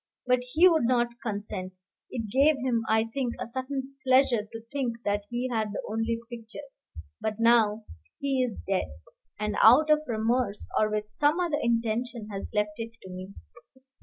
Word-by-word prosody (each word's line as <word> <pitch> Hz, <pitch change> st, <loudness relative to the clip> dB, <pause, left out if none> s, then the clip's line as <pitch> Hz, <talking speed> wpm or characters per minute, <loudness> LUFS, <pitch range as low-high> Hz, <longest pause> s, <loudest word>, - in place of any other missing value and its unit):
But 250 Hz, 0 st, +3 dB
he 340 Hz, +4 st, +7 dB
would 320 Hz, -8 st, +3 dB
not 240 Hz, -1 st, +2 dB
consent. 200 Hz, -4 st, -4 dB, 0.4 s
It 225 Hz, -3 st, -4 dB
gave 280 Hz, +4 st, +4 dB
him, 245 Hz, -3 st, 0 dB
I 220 Hz, 0 st, +4 dB
think, 235 Hz, +1 st, -3 dB
a -, -, -3 dB
certain 265 Hz, +2 st, -5 dB
pleasure 255 Hz, -4 st, +3 dB
to 225 Hz, -, -7 dB
think 240 Hz, -5 st, -3 dB
that 205 Hz, 0 st, -1 dB
he 240 Hz, +1 st, -2 dB
had 215 Hz, -3 st, -1 dB
the -, -, -4 dB
only 225 Hz, +1 st, -1 dB
picture. 235 Hz, +3 st, -9 dB, 0.6 s
But 215 Hz, 0 st, -2 dB
now 225 Hz, -2 st, +4 dB, 0.3 s
he 275 Hz, -2 st, 0 dB
is 245 Hz, -5 st, -2 dB
dead, 195 Hz, -1 st, 0 dB, 0.5 s
and 210 Hz, -1 st, -1 dB
out 290 Hz, +8 st, +7 dB
of 305 Hz, 0 st, +5 dB
remorse, 225 Hz, -1 st, 0 dB
or 215 Hz, -, +3 dB
with 210 Hz, 0 st, -3 dB
some 295 Hz, +7 st, +2 dB
other 340 Hz, -4 st, +1 dB
intention, 230 Hz, -1 st, -1 dB
has 195 Hz, -1 st, -5 dB
left 210 Hz, 0 st, -1 dB
it 230 Hz, 0 st, -5 dB
to 190 Hz, -, -9 dB
me." 185 Hz, +2 st, -8 dB
230 Hz, 170 wpm, -28 LUFS, 215-255 Hz, 0.6 s, he